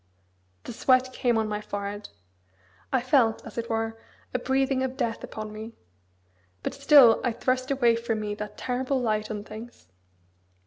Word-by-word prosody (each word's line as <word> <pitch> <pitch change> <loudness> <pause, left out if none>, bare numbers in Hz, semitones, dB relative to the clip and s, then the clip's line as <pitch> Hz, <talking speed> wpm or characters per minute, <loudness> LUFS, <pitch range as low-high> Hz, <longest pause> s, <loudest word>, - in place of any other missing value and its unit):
The - - -7
sweat 255 +2 +3
came 240 -3 +1
on 220 -1 +1
my 210 0 -3
forehead. 205 0 -5 0.8
I 260 - +2
felt 245 -3 +2
as - - -6
it 230 - -5
were 225 0 -2 0.3
a 255 - 0
breathing 265 +1 +1
of 260 0 -2
death 235 -4 -2
upon 215 -1 -6
me. 220 +2 -8 0.9
But - - -2
still 275 -4 +7
I 245 - +1
thrust 255 +2 -1
away 245 -4 +3
from 230 -1 -2
me 210 -1 -3
that 210 0 -7
terrible 260 +2 -1
light 215 -3 -1
on 210 -2 -4
things. 220 - -11
230 Hz, 165 wpm, -26 LUFS, 215-255 Hz, 0.9 s, still